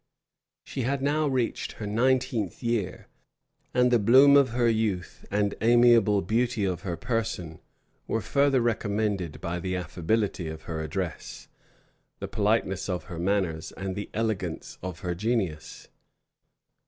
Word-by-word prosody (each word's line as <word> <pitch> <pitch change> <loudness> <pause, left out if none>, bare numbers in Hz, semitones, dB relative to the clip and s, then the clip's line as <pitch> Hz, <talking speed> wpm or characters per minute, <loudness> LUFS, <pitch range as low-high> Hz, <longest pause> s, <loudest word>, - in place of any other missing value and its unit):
She - - -5
had 135 +2 -1
now 150 +2 +1
reached 130 -4 -1
her 105 - -7
nineteenth 115 -2 0
year; 115 -6 -2 0.7
and 125 0 +3
the 120 - +5
bloom 130 +7 +7
of 140 -2 +5
her 120 +1 +1
youth 110 -6 -1
and 100 0 +1
amiable 115 -3 +5
beauty 115 +2 0
of 90 -3 -2
her 90 -3 -4
person 90 -6 -3 0.5
were 115 - 0
further 140 +4 +2
recommended 105 -6 -1
by 85 0 -3
the 90 +1 -2
affability 90 +2 -1
of 80 0 -7
her 80 -1 -4
address, 85 +2 -5 0.7
the - - -5
politeness 100 -2 0
of 90 -1 -2
her 85 - -5
manners, 85 -4 -1
and 95 -1 -5
the 105 - -5
elegance 105 -7 -3
of 90 -2 -6
her 90 -1 -2
genius. 95 -5 -2
105 Hz, 140 wpm, -27 LUFS, 90-120 Hz, 0.7 s, bloom